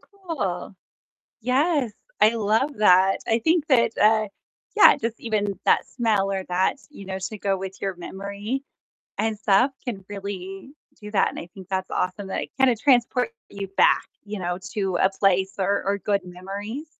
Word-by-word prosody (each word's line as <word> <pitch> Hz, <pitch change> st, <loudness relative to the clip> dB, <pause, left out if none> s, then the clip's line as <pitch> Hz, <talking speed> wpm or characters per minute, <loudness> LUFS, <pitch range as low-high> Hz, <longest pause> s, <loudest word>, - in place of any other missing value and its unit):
cool. 300 Hz, -, -5 dB, 0.7 s
Yes, 260 Hz, 0 st, +1 dB, 0.3 s
I 215 Hz, +2 st, +5 dB
love 225 Hz, +6 st, +1 dB
that. 190 Hz, -1 st, +5 dB
I 225 Hz, -, +2 dB
think 320 Hz, +4 st, +2 dB
that, 235 Hz, -5 st, +4 dB
uh, 215 Hz, 0 st, +4 dB, 0.5 s
yeah, 425 Hz, -, +8 dB
just, 230 Hz, 0 st, -3 dB
even 205 Hz, -3 st, -1 dB
that -, -, +3 dB
smell 215 Hz, -5 st, +1 dB
or 190 Hz, -1 st, -2 dB
that, 180 Hz, +6 st, +1 dB
you 200 Hz, -10 st, -11 dB
know, 190 Hz, 0 st, -4 dB
to 210 Hz, +3 st, -5 dB
go 195 Hz, -1 st, 0 dB
with 190 Hz, 0 st, -7 dB
your 195 Hz, -1 st, -2 dB
memory 200 Hz, +8 st, -5 dB, 0.6 s
and 220 Hz, -1 st, 0 dB
stuff 210 Hz, +6 st, +3 dB
can 205 Hz, -7 st, -5 dB
really 195 Hz, +1 st, -7 dB, 0.3 s
do 210 Hz, 0 st, -8 dB
that, 205 Hz, -, +3 dB
and -, -, -9 dB
I 170 Hz, -, -7 dB
think 190 Hz, -2 st, -11 dB
that's 190 Hz, -1 st, -2 dB
awesome 190 Hz, +2 st, -2 dB
that 190 Hz, -, -2 dB
it, -, -, -7 dB
kinda, 265 Hz, -2 st, +5 dB
transports 250 Hz, -, +2 dB, 0.2 s
you 200 Hz, -1 st, -6 dB
back, -, -, +4 dB, 0.2 s
you 210 Hz, 0 st, -5 dB
know, 180 Hz, -1 st, -2 dB
to 195 Hz, -5 st, -1 dB
a 190 Hz, +2 st, +3 dB
place 195 Hz, 0 st, +1 dB
or 200 Hz, +1 st, +1 dB
or 200 Hz, +1 st, 0 dB
good 200 Hz, -1 st, 0 dB
memories. 200 Hz, -, -7 dB
205 Hz, 175 wpm, -24 LUFS, 190-235 Hz, 0.7 s, yeah